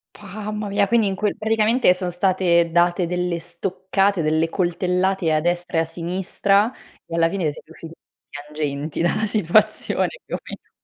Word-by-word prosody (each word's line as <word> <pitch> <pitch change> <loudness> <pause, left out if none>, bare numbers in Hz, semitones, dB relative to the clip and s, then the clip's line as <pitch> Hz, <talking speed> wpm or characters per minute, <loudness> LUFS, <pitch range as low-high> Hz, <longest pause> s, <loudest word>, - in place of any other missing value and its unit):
Mamma 210 +1 -6
mia, 200 0 +2
quindi 230 -2 +3
in 190 - -2
quel 210 +1 -1
praticamente 220 -1 +3
son 180 -1 -4
state 175 -2 +2
date 175 +1 +2
delle 180 0 -2
stoccate, 185 +2 -1
delle 160 +1 +1
coltellate 180 0 0
a 155 - +3
destra 175 0 -1
e - - +4
a - - +1
sinistra, 190 +6 0 0.3
e 165 - -6
alla 165 0 +3
fine 170 -5 -1
siete 155 - -14
usciti 165 0 -11 0.4
piangenti 150 +1 -4
dalla 195 +5 +1
situazione, 215 +1 +1 0.2
più - - -4
o - - -5
meno. - - -11
180 Hz, 160 wpm, -22 LUFS, 165-200 Hz, 0.4 s, e